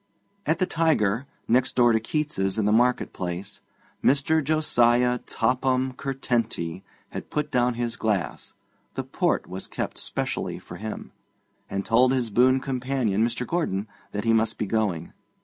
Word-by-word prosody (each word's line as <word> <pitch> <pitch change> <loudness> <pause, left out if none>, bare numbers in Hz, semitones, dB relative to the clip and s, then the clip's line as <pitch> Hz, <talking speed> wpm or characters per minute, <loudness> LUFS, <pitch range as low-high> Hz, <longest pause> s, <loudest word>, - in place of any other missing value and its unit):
At 160 +2 +3
the 185 - +2
Tiger, 140 - +1 0.2
next 125 +2 +2
door 120 -1 +5
to 110 - +3
Keats's 115 -6 -1
in 110 - +1
the 105 - +3
market 120 +3 +2
place, 95 +3 -5 0.4
Mr. 145 +3 +3
Josiah 125 -5 +3
Topham 130 +3 0
Curtenty 120 -10 -2 0.3
had - - -7
put 150 0 -2
down 125 -1 +2
his 120 -1 -2
glass 105 -5 -2 0.4
(the - - -2
port - - 0
was 95 +1 -6
kept - - -4
specially - - -2
for 85 - -10
him), 110 +2 -6 0.6
and 100 0 -3
told 125 +3 +4
his 125 -4 0
boon 130 +4 +5
companion, 125 -5 0
Mr. 120 +1 -1
Gordon, 110 - -1 0.2
that 105 - -3
he 115 0 +3
must 110 0 +2
be - - -1
going. 105 -5 -1
120 Hz, 150 wpm, -25 LUFS, 105-130 Hz, 0.6 s, door